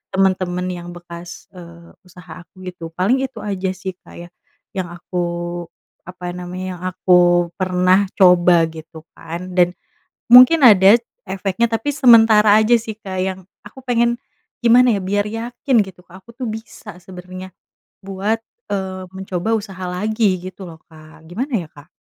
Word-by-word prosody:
temen-temen 185 -1 0
yang 175 -1 -7
bekas, 175 0 -11
eee, 170 -1 -14
usaha 180 -1 -13
aku 185 - -19
gitu 170 -2 -10
paling 235 +10 +1
itu 260 -4 -10
aja 195 -2 -3
sih 185 0 -7
Kak - - -15
ya - - -24 0.5
yang 180 -3 -4
aku 175 +1 -6 0.8
apa 180 0 -8
namanya 180 +1 -6
yang 175 - -16
aku 180 -1 +3
pernah 185 +1 +2
coba 180 -3 +5
gitu 160 0 -12
kan 170 +3 -8
dan 175 -1 +4 0.6
mungkin 255 +6 +9
ada 200 +1 +7 0.3
efeknya, 195 +4 -1
tapi 225 +6 -2
sementara 225 -5 +6
aja 220 +2 +3
sih 220 -2 -7
Kak 190 -3 -7
yang 190 0 -2 0.3
aku 215 +6 -13
pengen, 235 -1 +1 0.5
gimana 240 +1 +5
ya - - -3
biar 200 +2 -1
yakin 235 +3 -1
gitu 190 -2 -14
Kak 185 +1 -16
aku 235 - -15
tuh 250 -3 -4
bisa 220 -1 -9
sebenernya 185 +1 -10 0.5
buat, 195 +3 -2 0.3
eee, 190 -1 -4
mencoba 190 +2 -4
usaha 195 -3 -8
lagi 210 +1 0
gitu 190 +1 -12
loh 160 - -13
Kak 155 0 -17
gimana 255 - -5
ya 155 - -16
Kak? 145 +2 -16
185 Hz, 155 wpm, -19 LUFS, 180-215 Hz, 0.8 s, mungkin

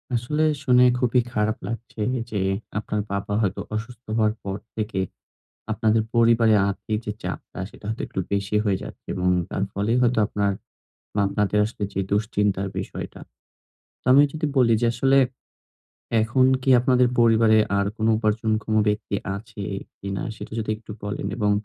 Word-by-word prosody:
আসলে 150 +7 0 0.2
শুনে 125 -2 +5 0.2
খুবই 125 0 +3
খারাপ 110 0 +1
লাগছে 115 -1 -6 0.3
যে, 105 - -1 0.4
আপনার 105 0 -2
বাবা 100 +1 -2
হয়তো 100 -1 -1
অসুস্থ 115 +2 -6
হওয়ার 110 -1 +3
পর 100 0 -3 0.2
থেকে 105 -3 -2 0.7
আপনাদের 110 0 +2
পরিবারে 115 -1 +5
আর্থিক 105 +2 -2
যে 105 - -1
চাপটা - - -6
সেটা - - -17
হয়তো 110 - -3
একটু 95 - -3
বেশি 100 +1 0
হয়ে 100 -3 +1
যাচ্ছে - - -10
এবং 90 0 0 0.2
তার 95 - -2
ফলেই 105 +5 0
হয়তো 120 -1 +3
আপনার 100 -2 0 0.6
বা 105 - -1
আপনাদের 105 0 0
আসলে 105 -2 -5
যে 95 - -2
দুশ্চিন্তার 100 -2 +1
বিষয়টা। 95 - -6 0.8
তো - - -41
আমি 140 +2 +8
যদি 155 0 -2
বলি 120 -3 +5
যে, 120 - +3
আসলে 135 +3 +3 1.1
এখন 125 +4 +2 0.2
কি 135 - +1
আপনাদের 125 -1 +3
পরিবারে 110 -1 +5 0.2
আর 100 - +1
কোন 110 - 0
উপার্জনক্ষম 110 0 0
ব্যক্তি 105 -1 -1 0.2
আছে 105 -1 -9 0.4
কিনা 95 -1 -4
সেটা - - -9
যদি 110 -1 -2
একটু 110 0 -14
বলেন 100 -1 -3
এবং 105 -3 +1
110 Hz, 155 wpm, -24 LUFS, 105-115 Hz, 1.1 s, আমি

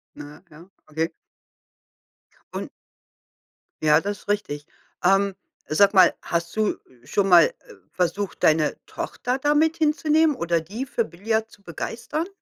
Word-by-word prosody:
Äh, 150 0 -11
ja, 165 +5 -15 0.2
okay. 160 +2 -2 1.4
Und - - -5 1.1
Ja, 150 +1 +4
das 205 +2 -4
ist - - -21
richtig. 150 -8 -2 0.4
Ähm, 195 +1 +3 0.3
sag 200 +6 +4
mal, 185 -3 +6
hast 170 +2 -2
du 215 -1 +1 0.3
schon 195 +9 0
mal, 175 -3 +8
äh, - - -3 0.4
versucht, 185 +1 -2
deine 155 -1 +3
Tochter 250 +1 -3
da 290 +2 +1
mit 315 +2 +2
hinzunehmen 310 0 +2
oder 170 -7 0
die 210 +11 -6
für 235 -2 -1
Billard 220 +5 -2
zu 205 - -19
begeistern? 230 - -4
200 Hz, 135 wpm, -24 LUFS, 165-235 Hz, 1.4 s, mal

